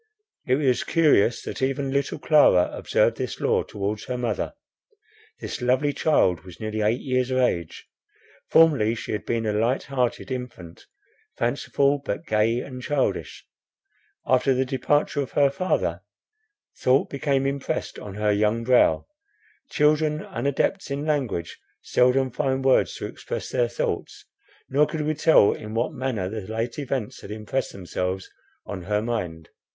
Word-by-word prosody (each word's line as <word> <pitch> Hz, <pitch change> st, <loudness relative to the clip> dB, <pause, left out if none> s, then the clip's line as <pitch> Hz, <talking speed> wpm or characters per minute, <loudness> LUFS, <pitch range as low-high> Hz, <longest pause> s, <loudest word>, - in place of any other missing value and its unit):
It 130 Hz, -, +4 dB
was 135 Hz, -3 st, +1 dB
curious 145 Hz, -9 st, +3 dB
that -, -, -6 dB
even 135 Hz, +1 st, 0 dB
little 140 Hz, +1 st, -1 dB
Clara 145 Hz, -, +4 dB
observed -, -, +1 dB
this -, -, -4 dB
law -, -, +2 dB
towards 105 Hz, +1 st, -4 dB
her 125 Hz, 0 st, -3 dB
mother. 120 Hz, -, -2 dB, 0.8 s
This -, -, -5 dB
lovely 130 Hz, +4 st, +2 dB
child 95 Hz, -, +2 dB
was 90 Hz, -2 st, -13 dB
nearly 110 Hz, 0 st, -3 dB
eight 110 Hz, +4 st, +1 dB
years 130 Hz, -2 st, 0 dB
of 130 Hz, -, 0 dB
age. 85 Hz, -10 st, -1 dB, 0.6 s
Formerly 140 Hz, -9 st, +4 dB
she -, -, -6 dB
had 105 Hz, -, -4 dB
been 115 Hz, -1 st, -1 dB
a 105 Hz, -, 0 dB
light 115 Hz, +5 st, +1 dB
hearted 130 Hz, -1 st, -2 dB
infant, 120 Hz, -10 st, -7 dB, 0.5 s
fanciful, 140 Hz, +1 st, +1 dB
but 155 Hz, +4 st, -4 dB
gay 110 Hz, +1 st, +1 dB
and 130 Hz, -2 st, -8 dB
childish. 140 Hz, +1 st, -2 dB, 0.8 s
After 130 Hz, +1 st, +3 dB
the 130 Hz, +1 st, +1 dB
departure 145 Hz, +2 st, 0 dB
of 135 Hz, -, -6 dB
her 140 Hz, -1 st, +4 dB
father, 185 Hz, +6 st, -1 dB, 0.8 s
thought 130 Hz, +2 st, +3 dB
became 140 Hz, -1 st, 0 dB
impressed 140 Hz, 0 st, -3 dB
on 100 Hz, -2 st, -8 dB
her 105 Hz, 0 st, +1 dB
young 105 Hz, +3 st, +1 dB
brow. 125 Hz, +1 st, +4 dB, 0.6 s
Children, 150 Hz, +1 st, +2 dB
unadepts 140 Hz, +7 st, -1 dB
in 140 Hz, +2 st, -3 dB
language, 130 Hz, -, -2 dB, 0.2 s
seldom 130 Hz, +1 st, +2 dB
find 130 Hz, +2 st, -1 dB
words 135 Hz, -, +3 dB
to -, -, -5 dB
express -, -, -6 dB
their 120 Hz, -1 st, +1 dB
thoughts, 120 Hz, -, -3 dB, 0.4 s
nor 145 Hz, +3 st, +3 dB
could 160 Hz, -, -3 dB
we 155 Hz, +1 st, 0 dB
tell 155 Hz, -8 st, +5 dB
in 110 Hz, +1 st, -8 dB
what 120 Hz, +7 st, 0 dB
manner 130 Hz, -8 st, -2 dB
the 110 Hz, +3 st, -4 dB
late 115 Hz, +4 st, -3 dB
events 130 Hz, -6 st, -3 dB
had -, -, -10 dB
impressed 110 Hz, +5 st, -3 dB
themselves 90 Hz, 0 st, -4 dB, 0.3 s
on 95 Hz, -2 st, -6 dB
her 105 Hz, +1 st, 0 dB
mind. 90 Hz, -9 st, -4 dB
125 Hz, 150 wpm, -24 LUFS, 110-140 Hz, 0.8 s, tell